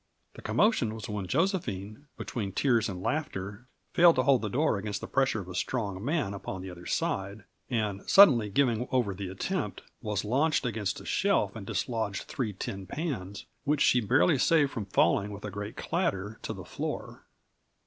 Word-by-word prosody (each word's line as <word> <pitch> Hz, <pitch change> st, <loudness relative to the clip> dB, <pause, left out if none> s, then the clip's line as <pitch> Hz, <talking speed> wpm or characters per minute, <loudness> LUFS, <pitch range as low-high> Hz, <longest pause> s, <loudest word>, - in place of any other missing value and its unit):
The -, -, -11 dB
commotion 130 Hz, -, +2 dB
was 110 Hz, -, -7 dB
when 105 Hz, -3 st, -4 dB
Josephine, 135 Hz, -, -1 dB
between 100 Hz, -6 st, -4 dB
tears 120 Hz, -2 st, +2 dB
and 90 Hz, -1 st, -6 dB
laughter, 105 Hz, -6 st, -3 dB, 0.3 s
failed 170 Hz, -1 st, +7 dB
to 130 Hz, -, +2 dB
hold 130 Hz, -2 st, +4 dB
the 105 Hz, -, -2 dB
door 130 Hz, -2 st, +1 dB
against 100 Hz, 0 st, -3 dB
the -, -, -6 dB
pressure 130 Hz, -6 st, +1 dB
of 90 Hz, -, -10 dB
a 90 Hz, -, -7 dB
strong 100 Hz, -1 st, -2 dB
man 140 Hz, -6 st, 0 dB
upon 95 Hz, -1 st, -6 dB
the 95 Hz, -, -6 dB
other 90 Hz, 0 st, -10 dB
side, 100 Hz, +2 st, -2 dB, 0.3 s
and, 105 Hz, -5 st, -1 dB
suddenly 130 Hz, -, +7 dB
giving 120 Hz, +1 st, +1 dB
over 120 Hz, -6 st, +1 dB
the 95 Hz, 0 st, -5 dB
attempt, 95 Hz, -, -3 dB, 0.2 s
was 105 Hz, -2 st, -2 dB
launched 140 Hz, +7 st, +2 dB
against 110 Hz, -5 st, -2 dB
a -, -, -12 dB
shelf -, -, +1 dB
and -, -, -8 dB
dislodged 110 Hz, -5 st, -2 dB
three 120 Hz, -6 st, -3 dB
tin 95 Hz, 0 st, -6 dB
pans, 105 Hz, -, -4 dB, 0.2 s
which 145 Hz, 0 st, +1 dB
she 125 Hz, -, +5 dB
barely 130 Hz, -, +3 dB
saved 150 Hz, -2 st, +4 dB
from 110 Hz, -, -4 dB
falling 100 Hz, +1 st, +2 dB
with 100 Hz, +1 st, -8 dB
a 105 Hz, -, -4 dB
great 105 Hz, +2 st, -6 dB
clatter 110 Hz, -, -2 dB
to -, -, -4 dB
the -, -, -7 dB
floor. -, -, -5 dB
110 Hz, 180 wpm, -29 LUFS, 100-135 Hz, 0.3 s, failed